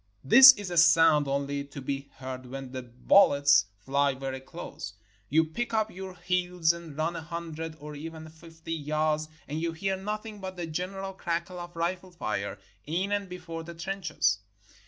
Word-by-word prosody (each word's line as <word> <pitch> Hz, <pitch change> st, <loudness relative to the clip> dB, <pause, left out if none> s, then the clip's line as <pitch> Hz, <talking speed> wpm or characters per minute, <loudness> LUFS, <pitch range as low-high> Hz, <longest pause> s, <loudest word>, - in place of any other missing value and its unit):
This 260 Hz, -, +11 dB
is 205 Hz, -6 st, -7 dB
a 175 Hz, -, -2 dB
sound 165 Hz, -3 st, +6 dB
only 140 Hz, +1 st, -1 dB
to 140 Hz, 0 st, -9 dB
be 140 Hz, +1 st, -4 dB
heard 130 Hz, -1 st, -7 dB
when 135 Hz, 0 st, -7 dB
the 130 Hz, 0 st, -4 dB
bul 125 Hz, +11 st, +5 dB
lets 140 Hz, -5 st, +4 dB
fly 140 Hz, +5 st, +1 dB
very 135 Hz, 0 st, -4 dB
close. 130 Hz, -7 st, -8 dB, 0.4 s
You 160 Hz, +3 st, +4 dB
pick 225 Hz, +9 st, -3 dB
up 220 Hz, 0 st, +1 dB
your 190 Hz, 0 st, -8 dB
heels 180 Hz, -1 st, +1 dB
and 170 Hz, -4 st, -10 dB
run 165 Hz, +2 st, 0 dB
a 165 Hz, -, -4 dB
hundred, 165 Hz, -1 st, -6 dB
or 150 Hz, 0 st, -8 dB
even 160 Hz, +2 st, -8 dB
fifty, 165 Hz, 0 st, -9 dB
yards, 155 Hz, 0 st, 0 dB, 0.2 s
and 150 Hz, +3 st, -3 dB
you 165 Hz, 0 st, -1 dB
hear 190 Hz, +4 st, -1 dB
nothing 210 Hz, +2 st, -5 dB
but 190 Hz, -1 st, -7 dB
the 175 Hz, -, -3 dB
general 195 Hz, +4 st, -4 dB
crackle 175 Hz, 0 st, -3 dB
of 175 Hz, 0 st, -8 dB
rifle 175 Hz, +2 st, -2 dB
fire 105 Hz, -, -3 dB, 0.3 s
in 180 Hz, +6 st, -2 dB
and 200 Hz, -2 st, -1 dB
before 170 Hz, -2 st, -6 dB
the 170 Hz, +1 st, -9 dB
trenches. 185 Hz, -, 0 dB
165 Hz, 180 wpm, -28 LUFS, 145-180 Hz, 0.4 s, This